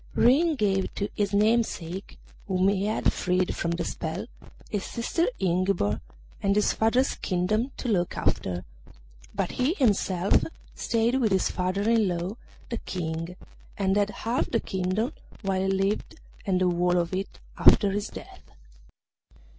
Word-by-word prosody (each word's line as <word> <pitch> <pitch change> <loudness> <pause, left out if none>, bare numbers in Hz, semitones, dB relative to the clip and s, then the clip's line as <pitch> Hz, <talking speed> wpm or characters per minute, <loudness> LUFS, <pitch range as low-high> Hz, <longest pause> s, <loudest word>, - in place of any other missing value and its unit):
Ring 305 +7 +4
gave 195 -6 +1
to 200 - -2
his 205 -1 0
namesake, 205 -4 0 0.3
whom 190 0 +3
he 200 0 0
had 215 - +1
freed 180 0 0
from 170 - -2
the 170 0 -1
spell, 170 +6 -4 0.4
his 205 -2 -2
sister 330 +9 -1
Ingiborg 180 - +1 0.4
and 195 0 +2
his 210 - +3
father's 245 +5 +2
kingdom 210 +7 0
to - - -4
look 180 -6 0
after, 90 -1 -1 0.7
but 195 -3 -1
he 265 +7 +1
himself 200 - +2 0.3
stayed 235 +3 +1
with 220 -4 +2
his 190 -1 +2
father 185 +3 -1
in 225 -3 +4
law 175 +3 -2 0.4
the 235 - -2
King, 165 -1 -4 0.4
and 195 -1 +1
had 205 0 +2
half 230 +4 -1
the 230 - +1
kingdom 190 +7 -1 0.3
while 190 -1 0
he 190 - 0
lived 195 +2 0 0.3
and 185 -2 +2
the - - +4
whole 175 0 +2
of 170 +1 0
it 190 +1 -3 0.2
after 200 -2 +6
his 205 +1 -2
death. - - -11
195 Hz, 150 wpm, -27 LUFS, 180-220 Hz, 0.7 s, after